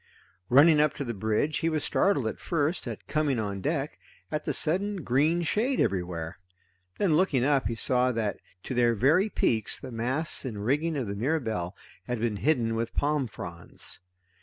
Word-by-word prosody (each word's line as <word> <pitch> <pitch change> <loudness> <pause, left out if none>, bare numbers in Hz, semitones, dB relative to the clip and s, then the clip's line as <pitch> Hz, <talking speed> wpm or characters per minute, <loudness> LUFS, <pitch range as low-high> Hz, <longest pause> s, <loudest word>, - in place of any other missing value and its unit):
Running 150 +4 +7
up 150 -1 +3
to 140 - -3
the 120 - -3
bridge 110 +8 0
he 165 - +1
was 155 -2 -1
startled 190 - +2
at 110 - -3
first, 155 -2 -1
at 115 -3 -6
coming 150 -3 +1
on 100 -3 -3
deck, 150 - -2 0.3
at 150 - -2
the - - 0
sudden 190 +3 0
green 150 +8 +2
shade 240 - 0
everywhere. 90 -5 -1 0.6
Then 190 -6 +2
looking 150 -7 +3
up 140 -3 +2
he 115 - -2
saw 125 +1 +2
that 110 -3 -2 0.2
to - - -4
their 120 -1 +3
very 160 - +3
peaks 110 - 0
the - - -8
masts 130 +7 -1
and 105 -6 -5
rigging 150 +5 +1
of 130 - -1
the 100 - -4
Mirabelle 110 - -1 0.3
had 125 -2 -2
been 110 -2 -1
hidden 120 -4 +1
with 115 +1 -3
palm 145 -2 +1
fronds. 85 -5 -7
130 Hz, 180 wpm, -28 LUFS, 115-155 Hz, 0.6 s, Running